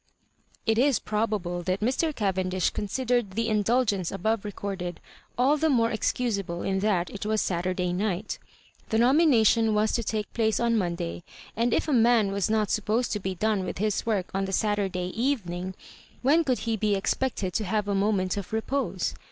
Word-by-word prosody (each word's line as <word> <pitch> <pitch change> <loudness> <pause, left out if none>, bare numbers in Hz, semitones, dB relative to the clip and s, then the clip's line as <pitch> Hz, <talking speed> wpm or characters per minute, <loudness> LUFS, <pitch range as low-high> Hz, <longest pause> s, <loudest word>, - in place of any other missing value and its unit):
It 225 0 +2
is 270 0 +4
probable 210 -5 -2
that 185 +2 -1
Mr. 260 +8 +1
Oayendish 185 - 0
considered 240 -1 -1
the 230 +3 -1
indulgence 210 -3 +1
aboye 215 +3 -1
recorded 190 -4 -5 0.4
all 270 +5 +4
the 320 +1 +2
more 230 -5 +3
ex 220 - +1
cusable 200 -8 -2
in 190 0 0
that 190 -4 0
it 200 - -6
was 215 +1 0
Saturday 180 0 -1
night 195 +1 -2 0.5
The 220 - +1
nomination 235 -4 +4
was 215 +1 +2
to 235 - 0
take 215 -1 -3
place 220 -2 +1
on 235 -1 +2
Monday, 175 -4 -2 0.3
and 235 +2 +1
if - - +1
a 300 - +1
man 230 -4 +4
was 200 +1 0
not 215 -2 +1
to - - -2
be - - +4
supposed 220 +3 -1
to 210 - -1
be 190 -1 -3
done 210 +1 0
with 180 - -4
his 210 +2 0
work 205 -5 -1
on 195 0 0
the 190 - -4
Saturday 190 -3 0
eyening, 190 -8 -2 0.5
when 305 +6 +4
could 255 -5 +1
he 225 -1 +1
.be 210 -1 +1
expected 195 -1 -1
to 215 - -1
haye 210 +3 0
a 205 - -1
moment 195 -1 +1
of 200 - -5
re 220 - +1
pose? 275 +5 -2
210 Hz, 190 wpm, -27 LUFS, 190-230 Hz, 0.5 s, is